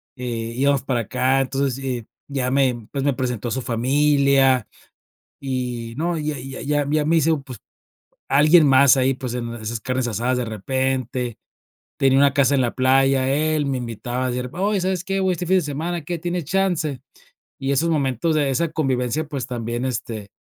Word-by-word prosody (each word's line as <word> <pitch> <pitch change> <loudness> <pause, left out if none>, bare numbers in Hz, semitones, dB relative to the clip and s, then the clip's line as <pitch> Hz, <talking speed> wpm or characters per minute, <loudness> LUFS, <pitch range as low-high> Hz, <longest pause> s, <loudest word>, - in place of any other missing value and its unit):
eh, 115 -3 -4
íbamos 140 0 +2
para 130 -3 0
acá, 130 +5 +1
entonces, 135 0 -2
eh, 125 -4 -3 0.2
ya 130 -2 -1
me, 130 -5 +1
pues, 140 - -1
me 140 0 +2
presentó 125 -2 -3
a - - -5
su 130 - -1
familia, 135 0 +3 0.7
y 125 -4 -4
no, 170 +2 -1
ya 150 -1 -2
ya 135 +1 -7
ya 145 0 0
ya 150 0 +1
me 165 +1 +3
hice, 160 +1 +3
pues, 130 -4 -9 0.7
alguien 155 +4 +6
más 135 -1 +6
ahí, 135 0 +2
pues, 125 -2 -5
en 120 -1 -4
esas 110 0 -5
carnes 130 +1 -1
asadas 120 +3 -1
de 125 - -1
repente, 125 +2 -2 0.6
tenía 135 0 +3
una 140 -1 +4
casa 140 -1 +3
en - - +2
la 120 - -1
playa, 135 0 +3
él 155 0 +1
me 135 -2 -1
invitaba, 120 +2 -3
me - - -3
decía: 125 0 -4
"Oye, 200 0 +1
¿sabes 185 -1 -1
qué? 195 0 -1
Voy 190 -1 +2
este 175 +1 -5
fin 190 +2 +4
de 180 - 0
semana, 160 +4 -3
¿qué, 170 +3 -4
tienes 175 0 -3
chance?". 170 -5 0 0.6
Y 135 0 -2
esos 160 +5 +1
momentos 145 +1 0
de 145 -3 +1
esa 155 +5 0
convivencia, 135 -1 -1
pues, 135 -5 -4
también, 120 -1 -3
este, 115 -4 -4
135 Hz, 190 wpm, -22 LUFS, 125-150 Hz, 0.7 s, alguien